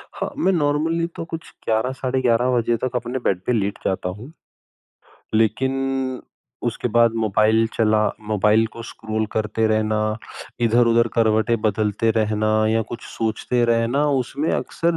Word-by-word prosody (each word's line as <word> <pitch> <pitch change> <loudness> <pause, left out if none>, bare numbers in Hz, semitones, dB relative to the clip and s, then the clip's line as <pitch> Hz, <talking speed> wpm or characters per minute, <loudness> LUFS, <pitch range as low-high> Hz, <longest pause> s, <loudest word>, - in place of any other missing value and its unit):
हाँ, - - -3
मैं 195 - +2
नॉर्मली 165 +1 +1
तो - - -4
कुछ 165 0 -7 0.2
11 110 +3 +1
साढ़े 130 0 -2
11 120 0 +2
बजे 120 0 +1
तक 130 +1 -3
अपने 125 +2 -2
बेड 95 -2 +1
पे - - +1
लेट 100 -2 -1
जाता 95 -1 -1
हूँ। 125 +8 -11 1.0
लेकिन 130 +3 0 0.5
उसके - - -2
बाद 115 -1 +5
मोबाइल 110 +1 +3
चला 110 -1 +3 0.3
मोबाइल 105 +2 +3
को 115 - -8
स्क्रॉल 110 -1 -4
करते 110 +1 0
रहना, 110 0 0 0.4
इधर-उधर 115 0 +3
करवटें 110 0 +2
बदलते 110 +1 +1
रहना 110 -1 0 0.2
या 115 0 +2
कुछ 120 0 -6
सोचते 115 +2 -1
रहना 115 +5 +2 0.2
उसमें 145 +6 -3
अक्सर 170 0 -1
115 Hz, 145 wpm, -22 LUFS, 110-130 Hz, 1.0 s, बाद